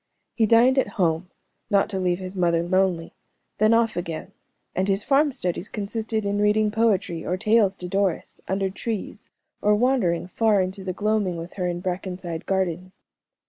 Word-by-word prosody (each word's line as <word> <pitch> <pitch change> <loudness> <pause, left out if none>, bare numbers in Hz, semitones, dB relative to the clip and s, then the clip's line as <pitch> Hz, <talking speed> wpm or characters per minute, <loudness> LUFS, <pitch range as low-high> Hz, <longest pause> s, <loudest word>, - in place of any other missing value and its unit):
He 225 -2 +2
dined 245 +4 +5
at - - +1
home, 170 -1 +1 0.4
not 200 -2 +3
to 190 - -2
leave 180 -1 +1
his 185 +1 -7
mother 170 -2 +2
lonely, 180 -2 0 0.5
then 215 +1 +4
off 230 -2 +3
again, 170 -2 -5 0.4
and 185 +2 0
his 195 +1 +1
farm 290 +1 +3
studies 180 -4 -3
consisted 220 +1 -3
in 200 0 0
reading 210 0 +3
poetry 205 -7 +1
or 180 - -1
tales 210 -1 +3
to 180 - -6
Doris, 195 -2 -1
under 190 0 -1
trees, 215 +1 -5 0.3
or 210 0 +4
wandering 215 -8 +1
far 215 0 +2
into 190 +1 -2
the 190 - -2
gloaming 205 -2 0
with 165 +1 -7
her 180 -2 -2
in 175 0 -3
Brackenside 180 -2 -4
garden. 185 -1 -1
195 Hz, 170 wpm, -24 LUFS, 180-215 Hz, 0.5 s, dined